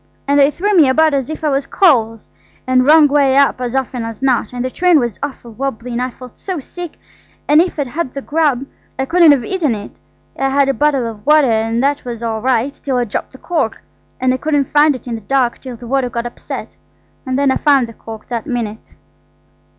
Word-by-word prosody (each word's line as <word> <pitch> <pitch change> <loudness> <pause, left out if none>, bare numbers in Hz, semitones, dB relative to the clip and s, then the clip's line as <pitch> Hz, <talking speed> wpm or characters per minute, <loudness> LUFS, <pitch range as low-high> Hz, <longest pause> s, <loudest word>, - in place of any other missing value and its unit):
And 285 +1 +3
they 280 0 +6
threw 405 +7 -1
me 310 -7 +6
about 315 +3 +3
as 275 -1 -1
if 315 0 -6
I 305 - +2
was 275 0 -1
coals–and 255 - 0
wrong 310 0 +7
way 275 -2 +3
up 280 -2 +3
as 250 0 -3
often 260 -2 -2
as 225 +2 -7
not. 250 -5 +1
And 250 0 -4
the 255 - -3
train 355 0 +3
was 240 -5 -3
awful 265 -4 -6
wobbly, 250 0 -4
and 240 +1 -2
I 255 - -1
felt 250 0 -14
so 370 -4 -4
sick, 350 +4 -9 0.5
and 300 +2 +6
if 355 -1 -2
I'd 285 - -1
had 265 +1 -4
the 275 - -4
grub 290 -4 0 0.3
I 265 - -1
couldn't 340 +2 +5
have 270 -5 +2
eaten 320 -11 0
it. 205 -1 -10 0.4
I 270 - +1
had 275 0 +2
a - - +2
bottle 285 -3 +1
of 220 -2 -7
water. 300 -3 +4
And 225 +2 0
that 285 +1 0
was 235 -2 -6
all 220 -1 -2
right 255 +2 +1
till 270 -3 -3
I 245 - +2
dropped 215 - -4
the - - -12
cork, 300 -7 -2 0.4
and 255 0 +2
I - - -1
couldn't 290 -1 -1
find 295 0 +5
it 255 - -10
in 240 - -3
the 225 - -5
dark 250 +2 0
till 255 -2 -7
the 240 - -12
water 260 +1 0
got 235 0 -4
upset, 240 - -7 0.5
and 260 0 -2
then 280 -1 +2
I - - +1
found 280 -4 +3
the 230 - -11
cork 220 -1 -10
that 235 -3 -4
minute. 225 -3 -5
265 Hz, 230 wpm, -16 LUFS, 240-290 Hz, 0.5 s, wrong